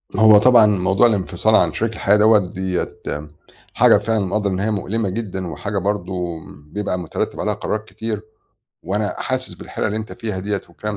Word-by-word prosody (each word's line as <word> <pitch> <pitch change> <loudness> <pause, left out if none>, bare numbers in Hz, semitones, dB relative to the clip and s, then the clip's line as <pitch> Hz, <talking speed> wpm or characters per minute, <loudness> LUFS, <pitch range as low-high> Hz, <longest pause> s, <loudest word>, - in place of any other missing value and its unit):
هو 110 -1 +7
طبعًا 115 0 +6
موضوع 100 +2 +3
الانفصال 105 0 +1
عن - - +3
شريك 115 0 -1
الحياة 105 -1 +2
دوّة، 110 0 +6
ديّة 95 -1 -3 0.8
حاجة - - +6
فعلًا 110 +1 0
مقدّر 100 +2 -1
إن 95 0 -2
هي 110 +2 0
مؤلمة 105 +1 -2
جدًا 95 -3 -4
وحاجة 100 +6 -4
برضه 90 -3 -2
بيبقى 90 +6 -5
مترتِّب 90 - -4
عليها - - 0
قرارات 110 0 -3
كتير 110 -2 -5 0.6
وأنا 105 +4 -2
حاسس 130 0 -3
بالحيرة - - -4
اللي 105 - -2
أنت 110 -4 -5
فيها 100 0 -4
ديّة 100 +1 -2
والكلام 105 +4 -5
105 Hz, 170 wpm, -20 LUFS, 95-110 Hz, 0.8 s, هو